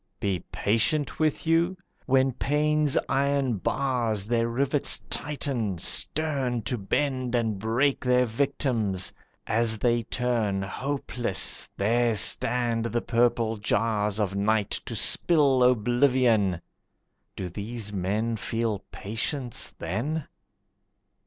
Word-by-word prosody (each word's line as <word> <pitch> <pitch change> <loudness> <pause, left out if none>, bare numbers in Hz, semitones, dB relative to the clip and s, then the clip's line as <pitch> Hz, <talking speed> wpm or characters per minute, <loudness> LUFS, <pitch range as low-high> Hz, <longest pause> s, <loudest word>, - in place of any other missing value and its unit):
Be 95 -3 -1
patient 115 +8 0
with 155 0 0
you? 170 +3 +1 0.3
When 135 0 +3
pain's 150 +2 +1
iron 140 -3 0
bars 120 -3 -1
Their 115 +1 0
rivets 140 +4 +1
tighten, 130 -9 -1
stern 135 - 0
To 125 - -2
bend 125 +3 -2
and 110 -4 -1
break 120 +7 0
their 125 0 +3
victims; 115 - -1 0.3
as 110 0 +1
they 120 +1 +1
turn, 115 -4 -1
Hopeless, 125 -1 0
there 115 +3 +1
stand 115 +2 +4
the 120 0 -1
purple 115 -2 +1
jars 105 0 0
Of 100 -2 -1
night 105 +1 0 0.2
to - - -5
spill 145 -6 +4
oblivion. 120 -5 +2 0.7
Do 95 - -5
these 105 +3 -5
men 105 +5 -1
Feel 115 -1 -2
patience 115 +4 -3
then? 130 - -3
120 Hz, 105 wpm, -26 LUFS, 110-135 Hz, 0.7 s, stand